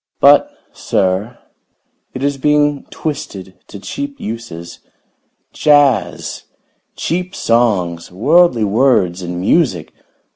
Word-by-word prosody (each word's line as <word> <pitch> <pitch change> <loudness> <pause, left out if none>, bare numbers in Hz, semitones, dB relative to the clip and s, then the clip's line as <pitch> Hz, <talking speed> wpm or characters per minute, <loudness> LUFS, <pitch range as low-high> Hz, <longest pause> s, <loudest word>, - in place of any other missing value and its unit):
But, - - +5 0.2
sir, 95 +6 -1 0.8
it 130 - -4
is 140 -1 -1
being 145 0 +1
twisted 100 - -6
to - - -10
cheap 285 - -6
uses. 85 -7 -7 0.7
Jazz! 145 -3 +1 0.5
Cheap 180 +3 -3
songs! 95 -9 0
Worldly 135 - +3
words 100 -5 +2
and 90 0 -5
music! 95 - 0
120 Hz, 95 wpm, -16 LUFS, 95-145 Hz, 0.8 s, But